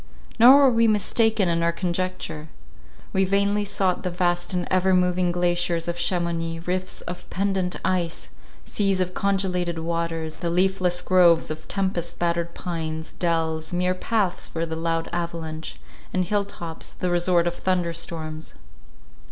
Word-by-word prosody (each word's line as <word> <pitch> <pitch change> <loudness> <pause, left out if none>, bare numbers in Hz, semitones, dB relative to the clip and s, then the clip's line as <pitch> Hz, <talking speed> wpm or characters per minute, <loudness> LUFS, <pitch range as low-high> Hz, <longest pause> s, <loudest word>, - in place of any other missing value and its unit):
Nor 250 +4 +9
were 275 - +7
we 230 -1 +4
mistaken 215 -1 +2
in 170 0 +1
our 170 0 +2
conjecture. 170 -3 -3 0.7
We 190 - +3
vainly 200 +2 +2
sought 190 -2 0
the 180 - -2
vast 175 0 0
and 180 -1 -1
ever 185 0 +3
moving 180 0 +2
glaciers 175 -1 0
of 170 - -1
Chamounix, 170 -2 -1
rifts 185 +1 -2
of 180 0 -8
pendant 190 -1 0
ice, 180 -3 -1 0.4
seas 195 -2 0
of 185 0 0
congelated 180 -4 0
waters, 165 -1 -3
the 170 - -1
leafless 180 0 +1
groves 175 -4 +4
of 155 0 -7
tempest 185 -4 -2
battered 170 0 -1
pines, 160 -3 -4
dells, 160 -2 0
mere 180 +1 +1
paths 190 -1 -1
for 165 0 -3
the 160 -1 -4
loud 165 0 -1
avalanche, 165 -2 -4 0.3
and 185 -1 0
hill 205 +2 0
tops, 170 -4 -8
the 180 -1 -2
resort 175 0 +2
of 175 - 0
thunder 175 -2 0
storms. 160 -2 -5
175 Hz, 150 wpm, -24 LUFS, 170-185 Hz, 0.7 s, Nor